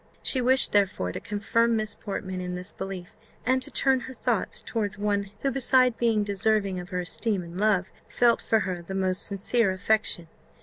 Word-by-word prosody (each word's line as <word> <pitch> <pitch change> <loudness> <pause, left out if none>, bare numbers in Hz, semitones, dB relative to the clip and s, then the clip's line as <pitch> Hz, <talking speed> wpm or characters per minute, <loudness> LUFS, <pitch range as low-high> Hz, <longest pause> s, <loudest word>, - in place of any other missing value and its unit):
She 260 - +4
wished, 260 +2 +4
therefore, 190 - +1
to - - -5
confirm 230 +2 +1
Miss 215 -1 0
Portman 190 -3 -5
in 180 0 -4
this 180 +3 -6
belief, 190 -2 -7 0.3
and 260 +1 +2
to - - 0
turn 265 -1 +2
her 260 +1 -9
thoughts - - -1
towards 215 -3 -2
one 200 -1 -1
who, 275 - +1
beside 255 -2 +3
being 225 -3 +2
deserving 200 -1 0
of 180 0 -8
her 180 0 -2
esteem 190 +2 -2
and 170 +2 -8
love, 205 -4 +2 0.2
felt 240 -1 +3
for 225 -1 +2
her 180 -3 -3
the 190 +3 -7
most 185 -1 0
sincere 200 +2 +1
affection. 190 -2 0
205 Hz, 185 wpm, -26 LUFS, 185-230 Hz, 0.3 s, She